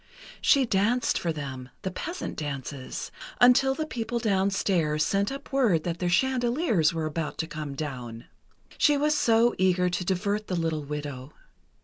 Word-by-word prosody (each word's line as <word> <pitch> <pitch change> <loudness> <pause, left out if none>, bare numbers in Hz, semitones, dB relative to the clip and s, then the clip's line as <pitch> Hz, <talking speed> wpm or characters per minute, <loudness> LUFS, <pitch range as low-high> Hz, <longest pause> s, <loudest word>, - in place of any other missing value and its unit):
She 275 -3 +4
danced 225 +4 +1
for 170 - -1
them—the 140 +2 -6
peasant 340 - -5
dances—until 150 - 0
the 310 - -2
people 240 -4 -3
downstairs 190 -7 +1
sent 200 - 0
up 275 0 -8
word 220 -13 +3
that 170 -1 -3
their 180 - 0
chandeliers 240 - +2
were 165 -1 -2
about 155 0 -3
to - - -1
come 155 -3 -6
down. 125 -5 -6 0.5
She 295 -1 +4
was 300 +1 +2
so 235 -3 +3
eager 180 -1 +2
to 180 - -1
divert 200 +3 -1
the 185 - -2
little 165 -3 -1
widow. 145 -2 -6
180 Hz, 145 wpm, -27 LUFS, 150-235 Hz, 0.5 s, She